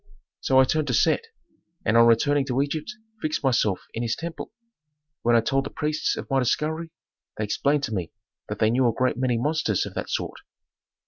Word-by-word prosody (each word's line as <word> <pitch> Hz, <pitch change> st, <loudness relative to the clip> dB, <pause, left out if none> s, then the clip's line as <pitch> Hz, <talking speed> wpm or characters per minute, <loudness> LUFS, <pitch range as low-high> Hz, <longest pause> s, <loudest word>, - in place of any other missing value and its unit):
"So 130 Hz, 0 st, +3 dB
I -, -, +8 dB
turned 155 Hz, +3 st, 0 dB
to 125 Hz, -, +1 dB
Set, 460 Hz, -, +2 dB, 0.6 s
and 110 Hz, -, +2 dB
on 115 Hz, 0 st, +7 dB
returning 140 Hz, +5 st, +3 dB
to 130 Hz, -1 st, 0 dB
Egypt 150 Hz, +8 st, -2 dB, 0.3 s
fixed 155 Hz, -1 st, -2 dB
myself 115 Hz, -7 st, +2 dB
in 115 Hz, -, -3 dB
his 115 Hz, -1 st, 0 dB
temple. 170 Hz, 0 st, -6 dB, 0.7 s
When 120 Hz, 0 st, +3 dB
I 115 Hz, -, +5 dB
told 135 Hz, +4 st, 0 dB
the 140 Hz, -, -5 dB
priests 155 Hz, 0 st, -1 dB
of -, -, -6 dB
my 135 Hz, -1 st, +1 dB
discovery 155 Hz, +6 st, -1 dB, 0.5 s
they 110 Hz, -, -1 dB
explained 140 Hz, +7 st, +1 dB
to 110 Hz, -, -2 dB
me 90 Hz, -5 st, -3 dB, 0.4 s
that 105 Hz, -, -3 dB
they 110 Hz, +1 st, +3 dB
knew 125 Hz, +1 st, +3 dB
a -, -, -1 dB
great 130 Hz, +2 st, +1 dB
many 125 Hz, -2 st, +1 dB
monsters 125 Hz, -, 0 dB
of -, -, -8 dB
that -, -, -4 dB
sort." -, -, -3 dB
130 Hz, 200 wpm, -25 LUFS, 115-150 Hz, 0.7 s, I